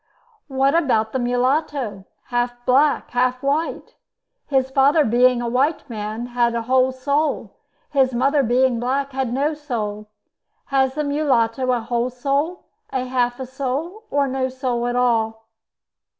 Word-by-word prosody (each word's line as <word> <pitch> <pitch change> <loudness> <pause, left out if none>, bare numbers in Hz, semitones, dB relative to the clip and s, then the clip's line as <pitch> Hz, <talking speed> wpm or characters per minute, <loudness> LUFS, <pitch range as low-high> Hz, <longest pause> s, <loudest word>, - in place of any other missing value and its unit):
"What 270 0 +2
about 245 -10 +2
the 260 - 0
mulatto? 245 -4 -1 0.2
Half 245 0 -2
black, 280 +4 +3
half 250 +1 0
white. 290 +4 -1 0.5
His 265 -2 +1
father 285 +3 +4
being 245 +1 +3
a - - -2
white 275 +6 0
man 215 +1 -4
had 240 -1 0
a 230 - -1
whole 260 +2 +3
soul; 280 +4 -1 0.4
his 265 -2 +3
mother 275 +4 +2
being 250 0 +2
black 270 +3 -1
had 265 -2 -2
no 280 +5 0
soul. 215 -8 -4 0.6
Has 265 -1 +2
the 300 - -1
mulatto 260 -4 +1
a 245 -2 0
whole 235 +2 -1
soul, 280 +7 -2 0.3
half 250 -1 -1
a 260 - -4
soul, 280 - -4
or 285 -1 +1
no 260 0 -1
soul 255 -2 -2
at 245 - -1
all?" 225 -2 +1
255 Hz, 145 wpm, -21 LUFS, 240-275 Hz, 0.6 s, father